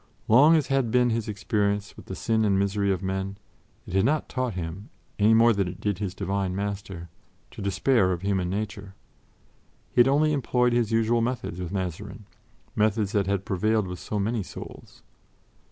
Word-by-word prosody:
Long 145 +9 +7
as 155 -4 +2
had 135 -4 +1
been 125 +1 +3
his 115 -1 -2
experience 100 0 -1
of - - -13
the 95 - -6
sin 110 -1 0
and 100 -2 +2
misery 100 0 +1
of 95 -1 -2
men, 95 +1 -3 0.5
it - - -9
had 95 0 +3
not 150 +2 +1
taught 130 -5 -2
him, 90 +3 -6 0.3
any 110 +2 +5
more 115 +1 +6
than 100 -3 0
it 90 +1 -7
did 100 -3 -2
his 100 -2 -4
Divine 95 -1 -2
Master, 100 -3 -5 0.4
to - - -9
despair 100 +1 +2
of 90 0 -3
human 95 -3 0
nature. 100 0 -5 1.0
He - - 0
had 120 - +7
only 150 +3 +3
employed 125 -3 +1
his 120 -2 +1
usual 115 +1 +2
methods 115 -7 -3
with 90 -1 -5
Mazarin: 100 +3 -5 0.5
methods 105 -1 +1
that 100 -4 +1
had 100 -1 -1
prevailed 110 +2 +1
with 90 -1 -6
so 105 - -4
many 110 +3 -1
souls. 90 - -11
100 Hz, 185 wpm, -26 LUFS, 95-115 Hz, 1.0 s, Long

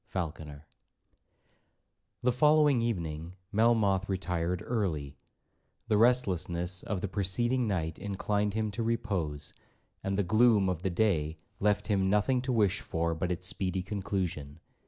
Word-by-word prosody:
FALCONER 80 -4 -5 1.6
The 125 - +4
following 150 0 +4
evening 85 -6 -3 0.2
Melmoth 105 -3 +2
retired 90 0 -1
early. 80 - -2 0.7
The 105 - +4
restlessness 95 -7 +1
of 100 -4 -3
the 100 - -1
preceding 115 +6 0
night 85 -5 -2
inclined 105 +1 -1
him 110 -1 -1
to 105 - -4
repose, 95 -11 -2 0.5
and 95 0 -1
the 100 - +2
gloom 110 0 +4
of 90 -3 -2
the 95 - 0
day 85 -5 +1 0.2
left 105 0 +1
him 95 -3 +1
nothing 105 +6 +2
to 130 +1 -2
wish 105 -5 +2
for 85 0 -1
but 90 +2 -2
its 90 +1 -3
speedy 95 -1 -1
conclusion. 95 -7 -3
95 Hz, 135 wpm, -30 LUFS, 85-110 Hz, 1.6 s, The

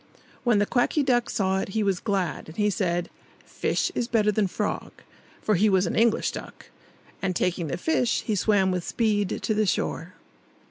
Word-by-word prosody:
When 240 -4 +3
the 205 - +3
Quacky 255 +6 +1
Duck 245 -3 +2
saw 190 -1 0
it, 195 - -3
he 215 - +2
was 195 -3 +1
glad; 195 -5 -2
and 160 - -12
he 210 -1 +2
said, 175 -3 -1 0.4
"Fish - - -1
is 240 - -1
better 215 -3 +2
than 210 -1 +1
frog" 205 +3 -3 0.5
(for 215 - +2
he 210 +3 +3
was 190 -1 +3
an - - -2
English 230 0 +2
duck)! - - -10 0.5
And, 185 -2 -1
taking 175 -2 0
the 140 - -3
fish, 250 - +1
he 220 - -1
swam 200 -1 +2
with 180 -1 -2
speed 210 -3 0
to 220 - +1
the 215 -1 +1
shore. 180 0 -2
205 Hz, 190 wpm, -26 LUFS, 185-220 Hz, 0.5 s, When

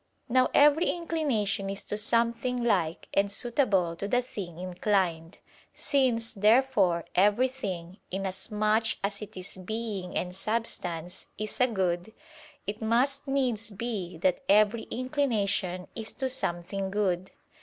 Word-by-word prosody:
Now 255 +1 +3
every 295 +4 +6
inclination 265 - 0
is 195 0 -3
to - - -3
something 235 +3 +1
like 180 -8 0
and 200 0 +2
suitable 200 -7 +2
to 200 - -3
the 245 +4 +2
thing 200 -10 -7
inclined. 180 -2 -1 0.4
Since, 245 -5 +1
therefore, 210 -5 +3
everything, 200 -4 +1
inasmuch 210 +4 0
as 200 +1 -2
it 210 -1 -9
is 185 +1 -7
being 205 -1 -4
and 180 0 -3
substance, 180 -5 -2
is 215 +3 -4
a 250 - +6
good, 185 -2 -1 0.5
it 210 +2 -4
must 260 +6 +1
needs 250 -5 0
be 200 -5 -4
that 180 - +1
every 215 +2 +4
inclination 215 -9 0
is 220 -1 -5
to 265 -1 -2
something 190 -5 -1
good. 190 -2 0
210 Hz, 125 wpm, -28 LUFS, 185-240 Hz, 0.5 s, every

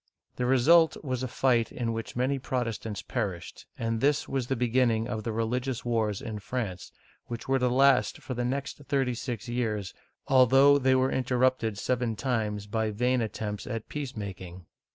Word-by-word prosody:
The 125 - 0
result 160 +6 +5
was 130 -3 -2
a 130 - -1
fight 120 -2 +1
in 115 -2 -2
which 115 0 -5
many 130 +3 0
Protestants 115 -5 -3
perished, 100 -8 -4
and 115 -1 -2
this 145 +1 +2
was 135 -3 -2
the 135 - 0
beginning 120 -2 +1
of 110 -3 -3
the 115 - -2
religious 120 +3 -2
wars 110 -4 0
in 110 -2 -5
France, 105 -5 -4 0.4
which 120 -1 -6
were 135 0 +2
to 125 0 +2
last 135 +1 +4
for 130 - -6
the 120 0 -2
next 135 +2 -3
thirty 135 -3 +1
six 120 -2 -5
years, 110 -6 -2 0.3
although 135 +2 +6
they 130 -1 +3
were 130 0 +2
interrupted 125 -4 +1
seven 120 0 -1
times 105 -4 -2
by 110 +1 -1
vain 125 +4 +1
attempts 105 -2 -4
at 115 -3 -5
peace 140 -4 -5
making. 95 -3 -7
120 Hz, 175 wpm, -28 LUFS, 110-130 Hz, 0.4 s, although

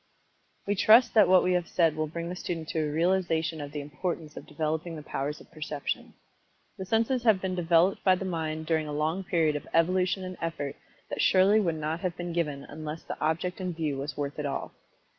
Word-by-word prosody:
We 205 - +1
trust 225 +4 +6
that 210 -4 +6
what 185 0 +6
we 180 - +2
have 175 -2 0
said 165 -3 +2
will 155 0 -1
bring 170 +2 -5
the 180 - -4
student 165 -3 -4
to 160 - -1
a 150 -1 0
realization 165 -1 +1
of 145 -1 -6
the 145 0 -4
importance 155 +1 -4
of - - -9
developing 155 +2 -2
the 155 - -8
powers 145 +1 -3
of - - -17
Perception. 155 -3 -4 0.6
The 190 - -4
senses 230 +4 +1
have 220 -5 +4
been 185 0 -2
developed 175 +1 +3
by 185 -1 +5
the 190 - -5
mind 160 -3 -3
during 160 -1 0
a 150 - -4
long 155 +6 -1
period 165 -4 +1
of 145 - -5
evolution 185 +3 +2
and 185 0 -6
effort 160 -4 -3 0.4
that - - -1
surely 195 +3 +5
would 170 -6 0
not 155 +1 -2
have 180 -1 -3
been 175 -1 -4
given 150 -5 -1
unless 155 +1 -7
the - - -6
object 170 +4 -1
in 180 -1 -2
view 155 -4 -2
was 140 0 -5
worth 145 0 -3
it 150 - -2
all. 140 - -4
165 Hz, 215 wpm, -28 LUFS, 155-185 Hz, 0.6 s, trust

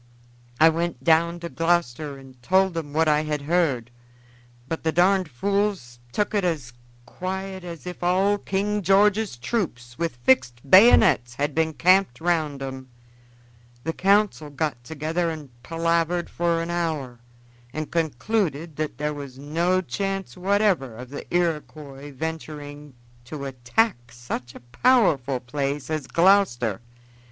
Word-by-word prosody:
I 160 - +8
went 165 -5 -2
down 170 +3 +3
to 170 - -5
Gloucester 160 -4 0
and 130 -2 -15
told 190 +5 +2
'em 155 -3 -4
what 160 +2 +2
I 150 0 +3
had 150 -2 -3
heard, 140 -7 0 0.8
but 165 - -3
the 160 - +1
darned 185 +1 +3
fools 195 -4 -1
tuk 210 - -1
it 205 -2 +1
as 150 -9 -2 0.3
quiet 190 +5 -5
as 170 -2 -8
if 180 0 -7
all 190 +3 +2
King 205 +2 -1
George's 200 - +3
troops 120 - -3
with 165 -6 -1
fixed 120 0 +1
bayonets 135 - +6
had 145 +2 -1
been 160 +1 +1
camped 185 -6 +3
round 155 -5 0
'em. 130 -1 -7 0.9
The 165 - -2
council 195 -5 +2
got 145 -4 -3
together 160 +5 -2
and 155 -4 -7
palavered 165 +3 0
for 170 -1 0
an 170 - -4
hour, 155 -8 -2 0.5
and 155 +2 -5
concluded 165 - -1
that 155 -1 -3
there 150 +1 -2
was 140 -3 -8
no 170 +6 0
chance 195 +6 -3
whatever 190 - +1
of 125 +3 -10
the 145 - -8
Iroquois 150 -4 -2
venturing 145 -1 -7 0.3
to 140 +2 -6
attack 125 - -1
such 120 +1 -6
a - - -11 0.2
powerful 160 - +3
place 140 +4 -3
as 155 -4 -2
Gloucester. 165 - +3
160 Hz, 140 wpm, -24 LUFS, 135-180 Hz, 0.9 s, I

